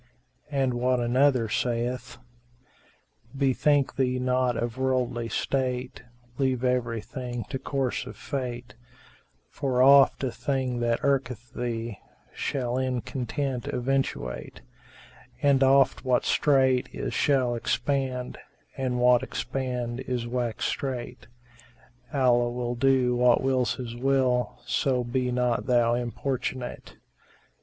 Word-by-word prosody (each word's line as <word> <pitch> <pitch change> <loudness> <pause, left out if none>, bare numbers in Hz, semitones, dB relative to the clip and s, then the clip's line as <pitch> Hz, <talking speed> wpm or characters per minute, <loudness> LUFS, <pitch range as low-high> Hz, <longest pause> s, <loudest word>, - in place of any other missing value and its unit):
And 135 -3 0
what 125 +1 +1
another 125 0 +3
saith, 120 +2 -2 1.2
"Bethink 140 +1 +2
thee 130 -1 +1
not 125 -1 +1
of 120 -1 -2
worldly 125 -3 0
state, 130 -1 -2 0.2
* 120 0 -31
Leave 130 -2 +1
everything 120 0 -2
to 135 - -2
course 135 -2 -2
of - - -9
Fate; 125 -4 -5 0.8
For 130 -3 +1
oft 140 0 +6
a 130 - 0
thing 130 -2 -2
that 120 -1 0
irketh 125 -4 -1
thee 115 -3 -4 0.2
* - - -33
Shall 125 -2 -2
in 130 -2 -1
content 125 +1 -3
eventuate; 120 - -2 0.8
And 140 -1 +4
oft 135 0 +4
what 130 -2 +1
strait 130 -3 +3
is - - -4
shall 130 -4 +2
expand, 125 +1 -2 0.2
* - - -32
And 130 -2 -1
what 125 0 +5
expanded 125 -1 -4
is 125 -2 -1
wax 120 -2 -2
strait. 130 -5 -4 0.8
Allah 125 -4 +3
will 120 0 -3
do 125 0 +2
what 125 +1 +4
wills 130 -4 +1
His 120 -2 -6
will 130 -1 +1
* - - -27
So 125 +1 +1
be 125 +1 -1
not 125 -1 0
thou 120 -2 +3
importunate! 125 +1 -3
125 Hz, 120 wpm, -27 LUFS, 120-130 Hz, 1.2 s, oft